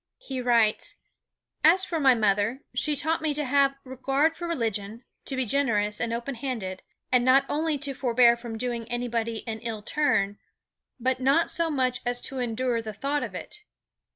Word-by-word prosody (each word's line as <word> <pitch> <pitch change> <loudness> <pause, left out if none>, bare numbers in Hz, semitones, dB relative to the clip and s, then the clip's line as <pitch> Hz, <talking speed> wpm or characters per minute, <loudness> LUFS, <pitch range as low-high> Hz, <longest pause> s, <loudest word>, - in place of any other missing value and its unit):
He 265 - -5
writes: 235 -3 +2 0.7
"As 360 +5 +6
for 330 - -2
my 265 -4 +5
mother, 215 +3 +1
she 300 -1 +1
taught 315 +3 +1
me 305 -2 0
to 300 0 -1
have 275 +1 +3
regard 270 +5 0
for 345 - -5
religion, 225 -6 -3 0.2
to 270 - -1
be 260 -1 0
generous 210 -5 0
and 235 -1 -1
open 235 +4 -3
handed, 230 -7 -4 0.3
and 250 -1 +4
not 260 +2 +5
only 310 0 0
to 280 0 -3
forbear 240 -2 +4
from 235 -1 -7
doing 235 -1 -3
anybody 235 -2 -2
an 220 -1 -3
ill 220 -2 -5
turn, 205 -9 +1 0.6
but 260 +1 0
not 275 +6 +3
so 335 -1 +1
much 255 -4 +1
as 245 0 0
to 270 - -4
endure 245 0 -1
the 220 -1 -6
thought 280 +7 -1
of - - -5
it." - - -7
250 Hz, 180 wpm, -26 LUFS, 230-280 Hz, 0.7 s, As